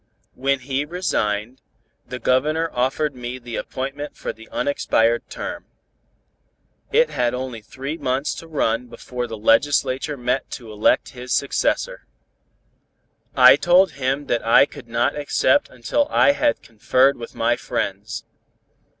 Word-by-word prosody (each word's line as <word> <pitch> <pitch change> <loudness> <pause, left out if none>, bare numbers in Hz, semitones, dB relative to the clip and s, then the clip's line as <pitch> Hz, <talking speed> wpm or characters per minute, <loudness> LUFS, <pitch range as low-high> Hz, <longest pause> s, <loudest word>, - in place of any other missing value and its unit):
When 135 0 0
he 135 +2 -1
resigned, 130 - -2 0.5
the 125 +1 -5
Governor 155 +7 +1
offered 135 +4 0
me 125 0 -6
the 120 -2 -8
appointment 135 +3 -5
for - - -4
the 115 0 -15
unexpired 120 -4 +1
term. - - -6 1.2
It 470 +3 +3
had 120 0 0
only 125 -3 -5
three 135 +8 -6
months 130 +3 -1
to 165 - -9
run 125 -6 0
before 125 0 -6
the 115 -1 -6
legislature 130 +5 +2
met 125 +2 -1
to 115 -4 -12
elect 105 0 +2
his 125 -1 -5
successor. - - 0 1.3
I - - +9
told 185 +2 +4
him 135 +2 -2
that 120 - -1
I 115 +4 +6
could 140 -3 -13
not 115 +1 0
accept 145 -2 +2
until 130 - -1
I - - +5
had 290 +1 0
conferred 130 +5 +2
with 115 -1 -9
my - - +2
friends. - - -4
130 Hz, 135 wpm, -22 LUFS, 120-145 Hz, 1.3 s, I